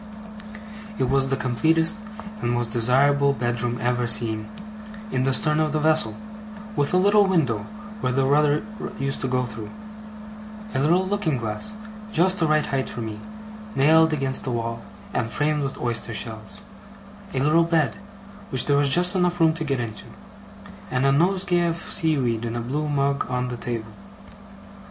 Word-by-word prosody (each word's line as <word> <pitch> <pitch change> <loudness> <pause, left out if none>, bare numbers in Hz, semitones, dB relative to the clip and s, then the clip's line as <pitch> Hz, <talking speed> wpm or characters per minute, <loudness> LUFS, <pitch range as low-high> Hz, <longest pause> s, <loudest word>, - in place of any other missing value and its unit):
It - - 0
was 135 0 +2
the 135 0 -1
completest 160 - +1 0.4
and - - -1
most 120 -2 -1
desirable 140 +5 +3
bedroom 120 -1 -1
ever 120 +1 0
seen 110 -1 +2 0.6
in 130 - 0
the 135 - +2
stern 150 +3 +2
of 155 -1 0
the 155 - +1
vessel; 155 +1 +3 0.6
with 145 -4 0
a 180 - +3
little 205 +2 +4
window, 130 - 0 0.3
where 130 - -1
the 135 +1 +1
rudder 145 +2 +2 0.3
used 135 0 -2
to 130 - -1
go 125 0 0
through; 110 -2 -8 1.0
a - - 0
little 175 +7 +2
looking 190 -8 0
glass, 115 - -3 0.4
just 185 0 +2
the 165 - +2
right 155 0 +2
height 135 -1 -2
for 120 - -6
me, 110 -1 -6 0.6
nailed 160 +4 +5
against 135 -3 +1
the - - -3
wall, 115 -1 -3 0.3
and 115 -1 -1
framed 150 +3 0
with 135 -1 -4
oyster 115 -1 -3
shells; 110 - -4 0.7
a - - -2
little 155 +5 +3
bed, 160 -9 +1 0.5
which 130 - +1
there 145 -1 +2
was 145 -1 +3
just 180 +6 +5
room 180 -2 +2
enough 165 -2 +2
to 160 0 -3
get 140 -4 -1
into; 115 -3 -6 0.8
and 125 +1 0
a 135 - +4
nosegay 175 +3 +2
of 165 0 -4
seaweed 130 -8 +1
in 115 0 -4
a - - -2
blue 145 +6 -3
mug 140 -1 0
on 125 0 -2
the 125 - -4
table. 115 -2 -5
135 Hz, 170 wpm, -23 LUFS, 120-160 Hz, 1.0 s, nailed